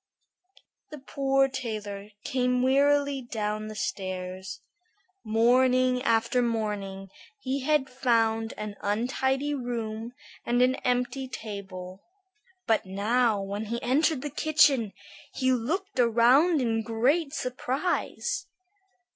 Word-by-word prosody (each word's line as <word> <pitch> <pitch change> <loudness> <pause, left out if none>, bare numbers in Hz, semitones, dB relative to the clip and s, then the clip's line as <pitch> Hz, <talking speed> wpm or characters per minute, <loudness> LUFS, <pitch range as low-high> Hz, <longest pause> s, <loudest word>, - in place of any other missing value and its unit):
The 300 - -8
poor 270 0 +1
tailor 210 -6 -5
came 250 -1 +1
wearily 280 +1 +3
down 215 -3 -3
the 215 - -7
stairs. 185 -1 -4 0.6
Morning 250 +3 +3
after 230 0 +2
morning 205 -5 -3 0.3
he 270 -6 -2
had 285 0 +1
found 225 -3 +1
an 210 -1 -6
untidy 265 +7 0
room 235 -3 -4 0.3
and 240 +1 +1
an 255 +1 +3
empty 250 +2 -1
table. 195 -5 -7 0.6
But 225 -1 +2
now 210 +2 +1
when 200 +2 -4
he 235 +2 -3
entered 285 +2 +2
the 295 - -4
kitchen, 290 -7 +3 0.4
he 260 0 +2
looked 320 - -2
around 250 +7 +4
in 225 -2 0
great 260 +8 +1
surprise. 285 - -2
245 Hz, 105 wpm, -27 LUFS, 215-270 Hz, 0.6 s, around